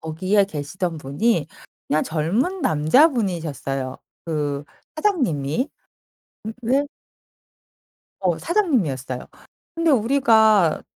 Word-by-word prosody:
거기에 185 +6 +1
계시던 165 +1 -4
분이 155 - 0 0.4
그냥 155 +1 +2
젊은 200 - -1
남자분이셨어요. 160 - +1 0.3
그 145 -3 -2 0.3
사장님이 255 - 0 0.7
근데 245 +6 -1 1.3
어 180 -4 0
사장님이었어요. 185 - -1 0.5
근데 330 -1 +1
우리가 220 - +4
185 Hz, 215 characters per minute, -22 LUFS, 150-250 Hz, 1.3 s, 우리가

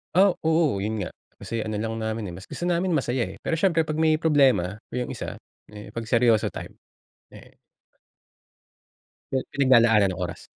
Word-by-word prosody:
Oh, 190 0 +5
oo, 160 -10 +2
'yun 110 +1 -2
nga. 95 - -3 0.3
Kasi 115 -1 -4
ano 110 -1 -3
lang 115 +1 -3
namin, 110 -1 -3
eh, - - -8
mas 95 - -10
gusto 175 - -4
namin 180 +1 +1
masaya, 130 -5 0
eh, - - -13
pero 165 - -1
siyempre 165 -2 +2
pag 155 - -2
may 155 0 +2
problema 135 - +3 0.2
yung 125 0 -2
isa, - - -6 0.3
eh, 105 0 -10
'pag 115 - -3
seryoso 115 -1 +2
time, - - -9 0.6
eh - - -15 1.8
'Yung 130 -1 -1
pinaglalaanan 115 -7 +4
ng 90 - -7
oras. - - -4
120 Hz, 170 wpm, -25 LUFS, 110-160 Hz, 1.8 s, Oh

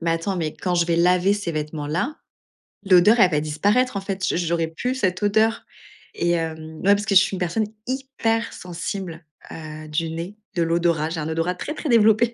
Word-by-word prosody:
«Mais 165 0 0
attends, 165 +4 -2
mais 160 -3 -2
quand 180 -2 -2
je 170 -1 +2
vais 170 - +1
laver 180 +3 +3
ces 205 -4 -2
vêtements-là, 155 - -3 0.7
l'odeur 195 +5 +6
elle 185 -4 +6
va 150 - +2
disparaître 200 +11 +1
en - - -3
fait, 195 -1 -3
j'au - - 0
j'aurais 170 -1 0
plus 245 +11 -3
cette 185 -6 -1
odeur.» 220 +2 +2 0.5
et 175 - 0
hem, 160 -1 -3
ouais, 200 +4 +4
parce 205 +1 -3
que 200 - +1
je 185 - +9
suis - - 0
une - - -5
personne 180 +5 0 0.2
hyper 255 -4 -1
sensible, 175 -1 -6 0.3
heu, 155 -1 -8
du 160 +2 -2
nez, 170 +5 -6 0.2
de 175 - +1
l'odorat, 165 -2 +1
j'ai 165 0 -4
un 150 - -3
odorat 165 +3 -1
très 300 - -5
très 315 - -5
développé, 225 0 +4
180 Hz, 205 wpm, -23 LUFS, 165-205 Hz, 0.7 s, je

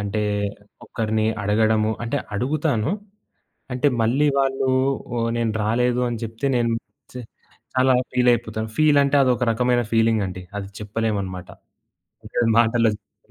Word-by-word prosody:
అంటే 105 +1 -2 0.6
ఒకరిని 110 -1 -1 0.2
అడగడము 110 +1 +2
అంటే 115 - -2 0.2
అడుగుతాను. 135 - 0 0.8
అంటే 130 +3 +2
మళ్ళీ 130 +7 +2
వాళ్ళు, 135 -1 +1 0.7
నేను 115 -2 0
రాలేదు 125 +3 +1
అని 120 -2 -3
చెప్తే 115 +4 -4
నేను 115 -1 +1 0.4
చా 125 - -5 0.5
చాలా 130 0 +4 0.2
ఫీల్ 125 0 +2
అయిపోతాను. 110 -1 -2
ఫీల్ 150 -2 +5
అంటే 140 +1 +2
అది 130 - +3
ఒక 120 - -1
రకమైన 120 +1 +2
ఫీలింగ్ 115 -1 +3
అండి. 95 0 -7
అది 100 -1 -5
చెప్పలేమన్నమాట. 100 -4 -3 0.8
అంటే - - -4 0.2
మాటల్లో 115 0 +3
చెప్పలేం. 105 0 -24
115 Hz, 130 wpm, -22 LUFS, 110-125 Hz, 0.8 s, ఫీల్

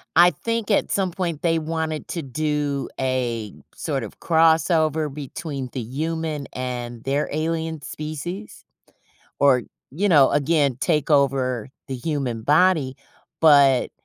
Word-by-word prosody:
I 175 +1 +8
think 230 -2 -3
at 205 - +2
some 190 -2 0
point 170 -4 -3
they 165 -1 +2
wanted 160 -1 -3
to 170 - -3
do 145 0 -2
a 120 -5 -1 0.2
sort 140 -6 -2
of 105 - -9
crossover 160 -2 +2
between 145 -2 -6
the - - -3
human 155 +4 -3
and 120 -2 -5
their 140 +2 0
alien 160 0 -2
species, 155 +8 -6 0.8
or, 135 -3 +4 0.3
you 190 +10 0
know, 145 -6 +6
again, 145 -3 +2
take 155 -2 0
over 130 -5 +2 0.2
the 135 - -5
human 125 -4 -3
body, 150 -2 +3 0.4
but 140 -5 +5
150 Hz, 130 wpm, -23 LUFS, 135-165 Hz, 0.8 s, I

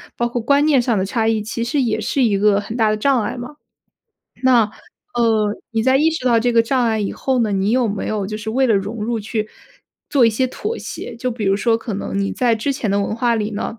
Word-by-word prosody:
包 240 - 0
括 240 0 -3
观 280 +5 +3
念 290 -5 +4
上 235 -3 0
的 190 - 0
差 220 +2 -1
异， 225 -1 +1
其 220 +2 -4
实 275 +4 0
也 220 -3 0
是 265 +4 0
一 205 -4 +2
个 205 0 +3
很 220 +4 -6
大 220 -2 +3
的 215 - +1
障 255 +2 +2
碍 - - -3
吗？ 250 +5 -8 0.9
那， 250 -3 +5 0.5
呃， 220 -3 +1 0.2
你 225 0 0
在 260 +2 +4
意 315 +3 +3
识 320 -5 -4
到 235 -2 +4
这 240 +2 +1
个 230 -1 +5
障 250 +1 +1
碍 220 -1 0
以 200 - -1
后 260 -2 -1
呢， 220 -2 +1
你 195 +1 0
有 250 -2 +2
没 200 -1 -3
有 210 -2 -2
就 215 +2 -4
是 215 +1 -5
为 260 +4 +2
了 220 - +4
融 210 +3 -2
入 235 0 -1
去 215 0 -3 0.6
做 275 -5 +4
一 230 - +5
些 255 +4 0
妥 425 - -4
协？ 240 - -7
就 250 +2 -2
比 225 -3 -4
如 195 0 +2
说 225 +2 +2
可 225 0 -6
能 195 - -4
你 200 0 0
在 240 -2 +2
之 230 +6 -1
前 245 -4 -3
的 200 +1 +1
文 200 +2 -2
化 235 0 +1
里 215 -1 -2
呢， 215 +2 -4
230 Hz, 285 characters per minute, -19 LUFS, 215-250 Hz, 0.9 s, 那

